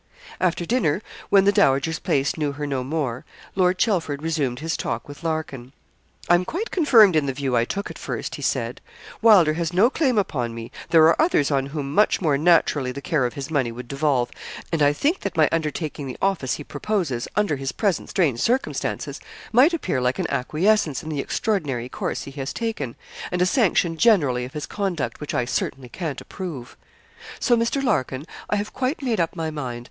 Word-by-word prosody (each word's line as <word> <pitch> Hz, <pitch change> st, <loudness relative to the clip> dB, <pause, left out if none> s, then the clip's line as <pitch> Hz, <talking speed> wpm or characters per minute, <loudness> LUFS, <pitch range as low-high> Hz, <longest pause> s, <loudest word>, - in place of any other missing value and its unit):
After 175 Hz, -1 st, 0 dB
dinner, 185 Hz, -, +1 dB, 0.3 s
when 195 Hz, -1 st, +6 dB
the 200 Hz, -, +6 dB
dowager's 145 Hz, -2 st, +2 dB
place 140 Hz, 0 st, 0 dB
knew 150 Hz, -3 st, -1 dB
her 145 Hz, +1 st, -4 dB
no 135 Hz, -3 st, -2 dB
more, 135 Hz, -4 st, -2 dB, 0.3 s
Lord 185 Hz, -1 st, +2 dB
Chelford 165 Hz, -9 st, 0 dB
resumed 150 Hz, -7 st, -1 dB
his 160 Hz, +4 st, -2 dB
talk 115 Hz, 0 st, -3 dB
with 145 Hz, +3 st, -11 dB
Larkin. 150 Hz, -6 st, -4 dB, 0.5 s
'I -, -, +5 dB
am 175 Hz, +1 st, +4 dB
quite 390 Hz, -, -4 dB
confirmed 230 Hz, -, +6 dB
in 150 Hz, -2 st, +2 dB
the 135 Hz, -, -1 dB
view 135 Hz, -2 st, -1 dB
I 115 Hz, 0 st, +3 dB
took 200 Hz, +10 st, -4 dB
at -, -, -11 dB
first,' -, -, -4 dB
he -, -, -6 dB
said. -, -, -2 dB, 0.4 s
'Wylder 195 Hz, -9 st, +6 dB
has 165 Hz, +1 st, -2 dB
no 210 Hz, +8 st, +4 dB
claim 265 Hz, -8 st, +1 dB
upon 125 Hz, -, -1 dB
me. 115 Hz, 0 st, -7 dB, 0.2 s
There 165 Hz, -2 st, +6 dB
are 165 Hz, -, +4 dB
others 235 Hz, -, +2 dB
on 135 Hz, -1 st, +1 dB
whom 140 Hz, -1 st, -4 dB
much 210 Hz, +6 st, +3 dB
more 155 Hz, -6 st, +2 dB
naturally 150 Hz, -4 st, +3 dB
the 135 Hz, -, -6 dB
care 150 Hz, -8 st, +1 dB
of 120 Hz, -, -9 dB
his 140 Hz, +2 st, -6 dB
money 135 Hz, -6 st, +1 dB
would 120 Hz, +1 st, -8 dB
devolve, 140 Hz, -2 st, 0 dB, 0.4 s
and 165 Hz, -2 st, 0 dB
I 145 Hz, 0 st, +5 dB
think 295 Hz, -, 0 dB
that 200 Hz, -, -5 dB
my 155 Hz, -2 st, +5 dB
undertaking 155 Hz, -2 st, -2 dB
the 130 Hz, -, -6 dB
office 185 Hz, -10 st, 0 dB
he 150 Hz, -, -7 dB
proposes, 165 Hz, -, -2 dB
under 205 Hz, -8 st, +1 dB
his 135 Hz, 0 st, -3 dB
present 200 Hz, -5 st, -1 dB
strange 145 Hz, -11 st, +1 dB
circumstances, 250 Hz, -, -1 dB, 0.3 s
might 255 Hz, +8 st, +6 dB
appear 185 Hz, -, -1 dB
like 125 Hz, +1 st, 0 dB
an -, -, -1 dB
acquiescence 160 Hz, +4 st, +1 dB
in 160 Hz, -, -6 dB
the 150 Hz, -3 st, -3 dB
extraordinary 140 Hz, -, -1 dB
course -, -, -3 dB
he 140 Hz, -, -9 dB
has 135 Hz, 0 st, -5 dB
taken, 220 Hz, -, -3 dB, 0.3 s
and 180 Hz, -, -2 dB
a 180 Hz, -, +4 dB
sanction 185 Hz, -, +2 dB
generally 145 Hz, -, +3 dB
of 130 Hz, -, -10 dB
his 150 Hz, -1 st, -4 dB
conduct, 190 Hz, -8 st, -3 dB
which 150 Hz, -, -4 dB
I 120 Hz, -, +1 dB
certainly 130 Hz, 0 st, -3 dB
can't 160 Hz, 0 st, -5 dB
approve. 160 Hz, -11 st, -7 dB, 0.6 s
So, 245 Hz, -, +3 dB
Mr. 235 Hz, +4 st, 0 dB
Larkin, 130 Hz, -, 0 dB, 0.2 s
I -, -, +1 dB
have 205 Hz, +1 st, -3 dB
quite 265 Hz, +4 st, -2 dB
made 235 Hz, -6 st, 0 dB
up 170 Hz, 0 st, 0 dB
my 160 Hz, -2 st, -3 dB
mind. 130 Hz, -6 st, -5 dB
155 Hz, 200 wpm, -23 LUFS, 135-195 Hz, 0.6 s, when